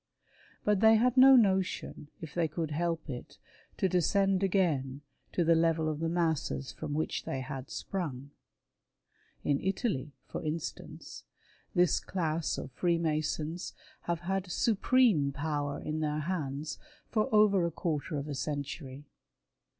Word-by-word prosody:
But 210 -2 +2
they 220 +1 +7
had 245 +3 +3
^no 265 0 +8
notion, 190 -7 0
if 160 -4 -8
they 170 -2 +1
could 155 0 -3
help 165 +1 -1
it, 125 -4 -7 0.4
to 190 - +2
descend 190 +2 +2
again 155 -9 +1 0.3
to 175 - +1
the 165 +1 +5
level 165 -1 +2
of 155 -1 -2
the 165 0 0
masses 160 -5 -1
from 150 -2 -5
which 155 - -1
they 135 - -3
had 130 0 -6
sprung. 145 -8 -4 1.1
In 140 -1 +1
Italy, 190 - -1
for - - -6
instance, 155 +1 -5 0.5
this 175 -3 +4
class 165 -3 -2
of - - -6
Freemasons 160 +1 -1 0.3
have 170 -1 -1
had 190 +1 -2
supreme 215 - +3
power 145 0 -2
in 155 +1 -3
their 150 -1 -1
hands 150 -3 -3 0.3
for 215 -2 +1
over 210 -4 +5
a 170 - +1
quarter 155 -1 -2
of 140 +1 -4
a 145 - -3
century. 140 -1 -5
160 Hz, 140 wpm, -31 LUFS, 145-185 Hz, 1.1 s, ^no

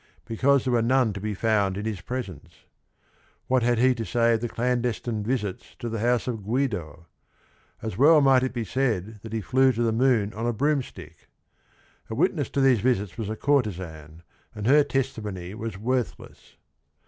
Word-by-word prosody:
Be 115 - -5
cause 140 +2 +3
there 130 - 0
were 120 - +3
none 125 -1 +2
to 100 - -7
be 105 0 -3
found 100 -2 +1
in 105 - -4
his 105 -5 -3
presence. 100 - -7 0.8
What 130 -1 +2
had 120 0 +2
he 130 +2 +4
to 115 -2 -4
say 115 0 +2
of 110 - 0
the 120 - -2
clandestine 120 -2 -1
visits 105 -5 -3
to 120 - -5
the 115 -1 -3
house 120 +2 +1
of 115 -4 -3
Guido? 105 - -2 0.8
As 110 +1 -5
well 155 +3 +7
might 135 -2 +5
it 130 - -1
be 120 -2 -3
said 110 -3 -1
that 110 - -9
he 110 -1 -2
flew 130 +6 +3
to 120 +1 -1
the 115 - +2
moon 115 -3 +2
on 115 +2 -3
a 120 - 0
broomstick. 110 - -3 0.8
The - - -4
witness - - +1
to 140 - -1
these 130 -4 +4
visits 105 -5 0
was 110 -3 -4
a 110 - -3
courtesan, 90 - -2 0.3
and 105 -1 -5
her 145 +5 +6
testimony 105 -10 -3
was 110 -2 -6
worthless. 125 +3 -4
115 Hz, 185 wpm, -25 LUFS, 105-130 Hz, 0.8 s, well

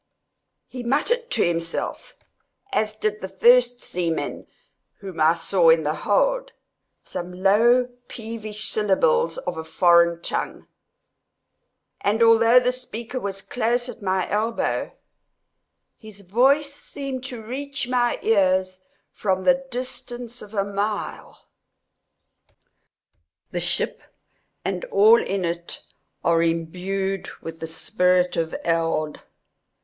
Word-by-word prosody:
He 255 - -7
muttered 410 - 0
to - - +2
himself, 165 0 -3 0.6
as 215 0 0
did 215 0 -2
the 190 - -4
first 245 +3 +4
seaman 170 -2 -3 0.5
whom 190 -4 -9
I 160 +2 +5
saw 170 0 +3
in 160 0 +5
the 150 +1 0
hold, - - +1 0.5
some 175 +1 -6
low 235 +5 +5 0.2
peevish 220 -2 -6
syllables 470 - +2
of - - -4
a - - -4
foreign 170 +1 +4
tongue, - - -3 1.4
and 215 +3 +2
although 230 +2 +6
the 250 0 +1
speaker 250 0 -5
was 195 -3 -5
close 240 +1 0
at 240 -1 -9
my 190 -2 0
elbow, 220 +3 -1 1.1
his 215 -3 -12
voice 270 +9 +2
seemed 275 -2 -6
to 245 -4 -6
reach 275 +3 -4
my 245 -1 +1
ears 185 -3 +2 0.3
from 190 -2 -1
the 270 +2 +2
distance 245 -1 -5
of 210 +1 -11
a 200 -1 +1
mile. 205 +1 -4 2.1
The - - -2
ship - - -1 0.6
and - - -2
all 450 -1 +6
in 195 - -2
it 170 0 -4 0.4
are 165 -1 +3
imbued 180 +4 -2
with 165 0 -8
the 165 - -5
spirit 180 +2 +1
of 165 -1 -1
Eld. 165 -2 0
215 Hz, 115 wpm, -23 LUFS, 180-250 Hz, 2.1 s, although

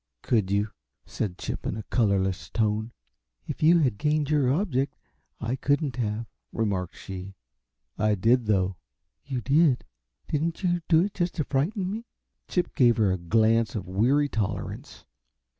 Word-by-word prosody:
"Could 110 -6 +1
you?" 100 +2 +1 0.3
said 95 -5 -3
Chip, - - -5
in 105 - -2
a 110 - -5
colorless 100 -5 0
tone. 110 0 0 0.5
"If 150 - -6
you 165 +3 +6
had 125 -8 +1
gained 150 0 +1
your 140 -4 +3
object, 140 -5 0 0.4
I 115 +3 -1
couldn't 140 0 0
have," 110 -1 -2 0.3
remarked 95 -6 -2
she. 95 0 -8 0.6
"I 105 0 +3
did, 115 +4 +3
though." 95 -3 +1 0.5
"You 130 -3 -3
did? 140 -1 +3 0.4
Didn't 165 +5 -1
you 175 -1 +1
do 165 0 +6
it 205 +1 -3
just 175 -1 -1
to 155 - 0
frighten 180 - -1
me?" 225 +3 -5 0.4
Chip 180 - -1
gave 120 -3 +4
her 105 -4 +3
a 95 - 0
glance 110 +5 +2
of 100 -5 -4
weary 125 +10 +2
tolerance. 105 -6 -4
120 Hz, 155 wpm, -27 LUFS, 105-150 Hz, 0.6 s, you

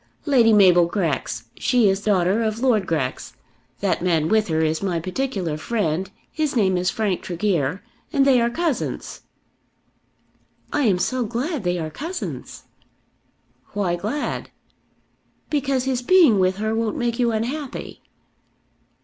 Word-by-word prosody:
"Lady 250 -7 +4
Mabel 180 -5 +6
Grex. 160 - -2 0.2
She 245 -4 +3
is 195 0 +1
daughter 195 0 +2
of 220 -1 -1
Lord 235 -7 +2
Grex. 135 -6 -2 0.5
That - - 0
man 165 -3 +1
with 220 -1 +2
her 160 -2 0
is 160 0 0
my 185 -4 -1
particular 185 - -3
friend. 190 -3 -1 0.2
His 305 -4 -1
name 190 -5 +3
is 180 +1 +1
Frank 210 -5 -1
Tregear, 175 -2 -1 0.3
and 280 -4 +3
they 260 -3 +5
are 235 - +2
cousins." 315 +1 -3 1.5
"I 290 -2 +2
am 195 -5 +3
so 250 +8 0
glad 245 - -3
they 180 0 0
are 160 -2 -4
cousins." 340 - -6 1.1
"Why 195 -4 0
glad?" 215 +12 -3 1.0
"Because 275 -3 0
his 260 -2 -1
being 300 - +5
with 185 0 +2
her 220 +1 -1
won't 225 -1 -1
make 240 0 -1
you 240 -1 +2
unhappy." 255 +6 -4
210 Hz, 140 wpm, -22 LUFS, 180-250 Hz, 1.5 s, Mabel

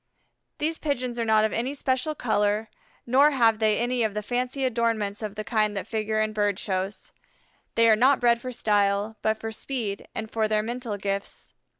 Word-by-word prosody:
These 320 +2 -2
Pigeons 255 -5 -2
are 230 - 0
not 220 -1 +4
of 220 - -2
any 255 +5 -2
special 265 +2 -1
color, 210 -3 0 0.4
nor 270 +5 +5
have 230 -6 +3
they 215 -2 +3
any 245 +1 0
of 215 -2 0
the 210 - -2
fancy 250 +4 -1
adornments 225 -4 0
of 210 -2 -5
the 215 - -4
kind 215 -2 0
that 195 - -3
figure 215 -1 -1
in 215 0 0
Bird 205 -2 +1
shows. 190 +1 -3 0.6
They 230 0 +5
are 220 - +7
not 260 +5 +4
bred 235 -1 +3
for 255 - -5
style, 205 -1 +1
but 220 0 +1
for 225 0 -5
speed 220 -3 -4
and 220 0 -5
for 220 -1 +1
their 215 0 +1
mental 235 -2 -4
gifts. 200 0 -5
220 Hz, 195 wpm, -26 LUFS, 210-245 Hz, 0.6 s, are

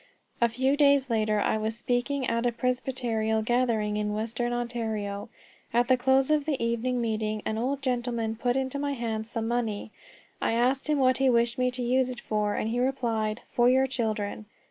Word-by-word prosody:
A 235 - +5
few 260 +4 +1
days 280 -3 +4
later 215 -1 +1
I 210 - +1
was 220 +1 -2
speaking 250 +3 -1
at 230 +1 +1
a - - +1
Presbyterial 235 -3 -1
gathering 225 -3 +1
in 210 0 -1
western 230 +2 -2
Ontario. 220 -4 -3 0.4
At 240 +1 +2
the 255 - +6
close 265 +2 +3
of 300 -2 +2
the 295 -4 -1
evening 235 +2 0
meeting 215 -2 -2
an 220 0 -1
old 270 +3 -2
gentleman 240 -3 -1
put 245 +2 0
into 265 +1 -1
my 285 0 -1
hands 225 -3 -3
some 230 -1 -3
money. 225 -3 -2 0.5
I - - +1
asked 255 +5 +1
him 300 - +3
what 255 -2 +3
he 270 -1 +3
wished 235 0 +2
me 250 0 +3
to 250 0 -4
use 255 +1 +2
it 250 -1 -6
for, 210 -1 -1
and 220 - -1
he 240 - 0
replied, 235 -4 -1
"For 240 0 +4
your 260 +1 +4
children. 215 -5 -3
240 Hz, 190 wpm, -27 LUFS, 220-255 Hz, 0.5 s, the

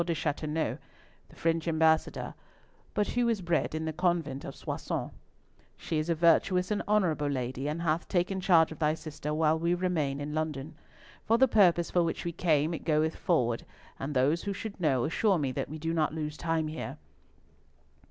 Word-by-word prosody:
de 170 -1 -1
Chateauneuf, 155 0 -2 0.5
the - - -17
French 165 0 0
Ambassador, 160 -1 +2 0.6
but 210 - +1
who 245 -1 +1
was 230 -3 +1
bred 170 -3 0
in 160 0 -2
the 160 - -2
convent 170 -5 0
of - - -7
Soissons. - - -4 0.7
She 160 -2 -2
is 155 +2 -2
a 170 - +2
virtuous 175 +3 +3
and 210 - +1
honourable 180 -8 +2
lady, 130 0 -2
and 155 +3 -2
hath 160 0 0
taken 190 +1 0
charge 165 -4 +5
of 160 - -9
thy 155 0 +2
sister 155 -2 -6
while 155 +1 +2
we 170 +2 +1
remain 160 -6 -1
in 145 +1 -4
London. 155 -2 -3 0.5
For 230 - +3
the 265 +2 +5
purpose 175 -7 +4
for 175 - +3
which 165 0 -2
we 170 - -1
came, 160 -1 +1
it 160 - -5
goeth 155 0 +1
forward, 125 - +1 0.4
and 140 +1 -4
those 145 +6 +3
who 200 - -1
should 200 -1 -7
know 135 -7 +2
assure 195 +4 +2
me 140 -4 -1
that - - -3
we 155 - -6
do 165 +1 -2
not 160 -1 0
lose 150 -1 -3
time 165 -1 -1
here. 155 -2 -5
160 Hz, 190 wpm, -29 LUFS, 150-175 Hz, 0.7 s, charge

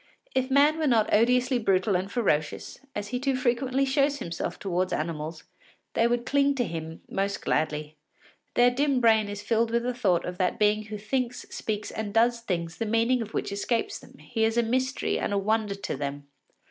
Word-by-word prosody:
If 260 0 0
man 290 +4 +4
were 310 - +1
not 225 -4 +3
odiously 250 +3 +3
brutal 195 -2 +2
and 190 +2 -1
ferocious, 155 -11 -1 0.2
as 205 0 -4
he 250 +2 -2
too 270 0 0
frequently 255 +1 +1
shows 280 +1 +2
himself 170 -10 -4
towards 185 -1 -1
animals, 155 0 -3 0.5
they 230 - +3
would 240 0 0
cling 280 +1 +2
to 250 - +1
him 160 -4 -6
most 195 +1 -2
gladly. 150 0 -1 0.6
Their 245 0 +5
dim 275 +1 +1
brain 220 -3 +4
is 205 0 -6
filled 225 +1 +1
with 235 +1 0
the 250 +1 -1
thought 195 -8 +1
of 180 0 -6
that 185 +3 +1
being 210 0 +2
who 215 0 -6
thinks, 245 +4 -2
speaks, 210 -1 -3
and 215 -1 -5
does 235 +1 +4
things 170 -6 -3
the 225 - -2
meaning 230 +3 +2
of 220 -1 -6
which - - -2
escapes 235 - -1
them; - - -16
he 225 -2 -3
is 225 +1 +1
a 235 - +4
mystery 260 +3 0
and - - -1
a - - +2
wonder 210 0 0
to 200 -6 -4
them. 140 +1 -4
225 Hz, 200 wpm, -27 LUFS, 195-250 Hz, 0.6 s, Their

